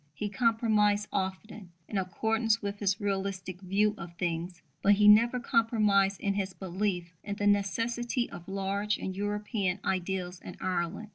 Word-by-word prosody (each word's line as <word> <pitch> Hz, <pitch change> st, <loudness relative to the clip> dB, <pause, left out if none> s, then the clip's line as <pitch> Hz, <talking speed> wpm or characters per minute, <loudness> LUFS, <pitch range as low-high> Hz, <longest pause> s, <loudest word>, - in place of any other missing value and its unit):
He 210 Hz, +4 st, -3 dB
compromised 215 Hz, -2 st, +2 dB
often, 190 Hz, 0 st, -4 dB
in 205 Hz, -, -1 dB
accordance 220 Hz, +4 st, +1 dB
with 200 Hz, -1 st, -4 dB
his 200 Hz, -1 st, +1 dB
"realistic" 195 Hz, -2 st, -3 dB
view 200 Hz, +3 st, +2 dB
of 170 Hz, 0 st, -8 dB
things; 170 Hz, 0 st, -3 dB, 0.2 s
but 205 Hz, -, +5 dB
he 205 Hz, +1 st, +4 dB
never 235 Hz, +4 st, +6 dB
compromised 210 Hz, -5 st, +2 dB
in 200 Hz, -, +1 dB
his 195 Hz, -1 st, -2 dB
belief 180 Hz, -2 st, -2 dB
in 200 Hz, -1 st, -4 dB
the 205 Hz, -, -2 dB
necessity 230 Hz, +5 st, +1 dB
of 175 Hz, -, -10 dB
large 195 Hz, +2 st, -1 dB
and 190 Hz, -, -5 dB
European 205 Hz, -1 st, -1 dB
ideals 185 Hz, -1 st, -2 dB
in -, -, -9 dB
Ireland. 180 Hz, +3 st, -2 dB
200 Hz, 150 wpm, -30 LUFS, 185-210 Hz, 0.2 s, never